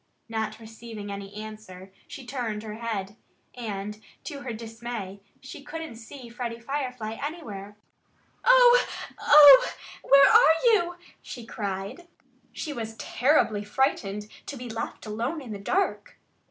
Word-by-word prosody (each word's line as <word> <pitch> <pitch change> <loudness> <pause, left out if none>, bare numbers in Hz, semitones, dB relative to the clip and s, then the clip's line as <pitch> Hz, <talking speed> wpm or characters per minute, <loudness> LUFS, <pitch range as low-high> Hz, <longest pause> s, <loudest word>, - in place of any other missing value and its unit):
Not 220 -1 -3
receiving 225 -2 -9
any 200 0 -7
answer, 210 -3 -9 0.2
she 270 - -9
turned 240 -5 -4
her 215 -1 -6
head. 210 -3 -4 0.4
And 210 -3 -6 0.2
to 290 -4 -6
her 255 - -5
dismay, 225 -3 -7 0.2
she 260 +2 -10
couldn't 310 -3 -7
see 240 +2 -11
Freddie 235 0 -5
Firefly 250 -4 -4
anywhere. 210 - -6 0.7
"Oh! - - +7 0.4
Oh! 290 -2 +9 0.3
Where 275 0 +7
are 450 -8 +7 0.2
you?" 350 -4 +1 0.3
she 240 -2 -9
cried. 200 - -5 0.4
She 300 - -5
was 225 -3 -6
terribly 245 -6 +1
frightened 210 -3 -1 0.2
to 285 - -6
be 245 0 -7
left 225 +1 -5
alone 230 +9 -3
in 255 -6 -9
the 205 - -5
dark. 375 - -1
230 Hz, 130 wpm, -26 LUFS, 210-275 Hz, 0.7 s, Oh